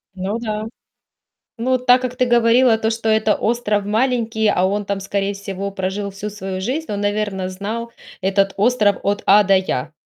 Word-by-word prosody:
Ну 195 +4 -3
да. 215 -2 -3 0.9
Ну, 255 +3 +1
так 250 0 +4
как 255 -1 -4
ты 255 0 +1
говорила 240 0 +4
то, 220 0 0
что 225 0 -2
это 220 -1 +3
остров 215 -3 0
маленький, 225 0 0
а 185 -3 +2
он 205 +2 -1
там, 200 0 -2
скорее 195 +1 -2
всего, 200 0 -5
прожил 195 +1 -3
всю 200 +2 -6
свою 190 -2 -5
жизнь. 265 +7 -3
Он, 205 -1 -3
наверное, 205 -2 -1
знал 215 +5 -5 0.3
этот 195 +1 +1
остров 210 -2 +3
от 205 +1 0
А 205 +2 +6
до 195 0 +4
Я. 160 -6 -1
210 Hz, 180 wpm, -20 LUFS, 195-230 Hz, 0.9 s, А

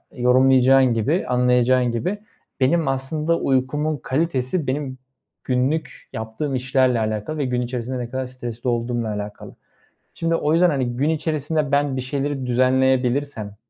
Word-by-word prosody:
yorumlayacağın 130 +1 +5
gibi, 140 - 0
anlayacağın 125 0 +3
gibi, 185 - -2 0.4
benim 155 +4 +2
aslında 150 +5 -1
uykumun 145 +4 0
kalitesi, 140 +2 -1
benim 130 -1 -3 0.5
günlük 135 +5 -1
yaptığım 110 +6 -4
işlerle 130 -1 +2
alakalı 110 +7 -2
ve 145 - -1
gün 125 -1 -1
içerisinde 125 +1 -4
ne 120 - -5
kadar 130 0 -3
stresli 120 -1 -5
olduğumla 120 -1 -1
alakalı. 105 0 -7 0.6
Şimdi 165 0 0
o 150 -1 +1
yüzden, 175 +2 +4
hani, 135 -3 0
gün 145 +4 +1
içerisinde 155 -1 -1
ben 140 -1 +1
bir - - -1
şeyleri 135 +1 -3
düzenleyebilirsem, 130 -2 +1
130 Hz, 135 wpm, -22 LUFS, 125-145 Hz, 0.6 s, yorumlayacağın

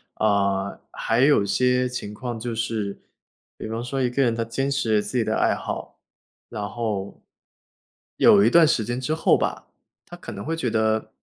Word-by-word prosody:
呃， 100 -2 0
还 115 - -1
有 140 -6 +5
些 125 +5 +1
情 105 -4 -6
况 120 +1 -5
就 120 +1 -4
是， 110 -3 -3 0.6
比 - - -6
方 115 +2 -4
说 135 +2 -3
一 125 - +1
个 140 - 0
人 120 -3 +2
他 115 - -1
坚 135 +4 -2
持 130 -6 +1
了 105 - +3
自 125 - -3
己 115 - +2
的 110 0 -1
爱 - - +2
好， - - -6 0.5
然 105 -1 -4
后 105 -3 -4 1.0
有 100 - +7
一 115 - +5
段 170 +3 +6
时 120 -8 +1
间 120 +1 -3
之 140 +4 -2
后 160 - +3
吧， - - -3 0.4
他 - - -11
可 - - -9
能 100 - -7
会 165 +2 -1
觉 145 -7 -2
得 110 0 0
115 Hz, 210 characters per minute, -24 LUFS, 105-125 Hz, 1.0 s, 有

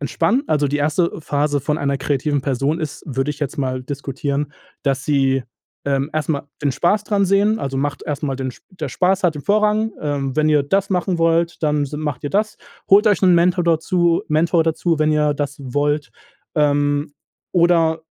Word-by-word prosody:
entspannen. 235 - 0
Also, 150 -1 +2
die 145 - -1
1. 155 +4 +1
Phase 145 -1 0
von 150 +2 -1
einer 140 -1 -1
kreativen 145 +1 0
Person 140 +4 -1
ist, 155 -3 -5
würde 135 +1 -1
ich 140 - -7
jetzt 145 -1 -3
mal 130 -1 -2
diskutieren, 140 +1 -3 0.3
dass 135 -1 0
sie, 135 -3 +2 0.4
ähm, 140 +2 0
erst 155 -1 -2
mal 140 -2 -1 0.2
den 140 - +2
Spaß 205 +7 +1
dran 200 -2 +1
sehen. 205 +3 +3
Also, 135 -1 -3
macht 145 +1 -2
erst 150 0 -4
mal 135 -2 -2
den 130 -1 -4 0.2
der 165 -6 -5
Spaß 190 +5 +1
hat 160 -4 +2
im 145 - -7
Vorrang, 215 +1 +2
ähm, 140 -2 -2
wenn 155 0 +3
ihr 150 -2 +4
das 195 +7 0
machen 180 -1 0
wollt, 165 0 +1
dann 150 -1 +1
s 140 - -9
macht 150 -3 -4
ihr 145 - -2
das, 215 +2 0 0.3
holt 205 +3 +6
euch 205 - +3
'n 180 -1 +6
Mentor 175 +1 +3
dazu 170 +1 +2
Mentor 160 +2 +2
dazu, 165 0 0
wenn 155 0 +2
ihr 150 -1 +2
das 145 0 -3
wollt, 145 +3 -1 0.5
ähm, 145 0 +1 0.4
oder 170 -2 +3
150 Hz, 190 wpm, -20 LUFS, 140-175 Hz, 0.5 s, holt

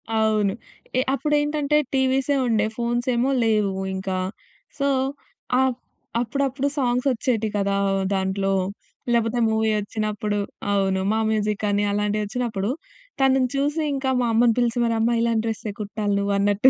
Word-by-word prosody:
అవును. 215 -2 +2 0.4
ఏ - - +4
అప్పుడేంటంటే 295 0 +1 0.2
టీవీసే 265 +2 +2
ఉండే 220 -3 +2
ఫోన్స్ 240 0 -1
ఏమో 245 +3 +2
లేవు 210 -3 +2 0.2
ఇంకా. 190 0 -2 0.6
సో 280 - +2 0.7
అపు 260 -2 +2 0.4
అప్పుడప్పుడు 270 +3 -1
సాంగ్స్ 250 -1 +1
వచ్చేటివి 225 -3 0
కదా! 200 0 +1 0.4
దాంట్లో. 195 0 0 0.6
లేకపోతే 235 +1 +1
మూవీ 220 0 +1
వచ్చినప్పుడు 210 0 -2 0.3
అవును. 195 -1 +1
మా 220 - +1
మ్యూజికని 210 -1 0
అలాంటి 210 +1 0
వచ్చినప్పుడు, 215 -2 -2 0.5
తనని 265 -1 +4
చూసి 290 +3 0
ఇంకా 270 -1 -1
మా - - +1
అమ్మని 230 +1 +4
పిలిచి 240 0 +1
మరి 230 -1 +1
అమ్మా 230 +2 +2
ఇలాంటి 230 -1 +1
డ్రెసే 220 -1 -3
కుట్టాలి 205 0 -2
నువ్వన్నట్టు 200 +3 +3
225 Hz, 130 wpm, -23 LUFS, 205-255 Hz, 0.7 s, ఏ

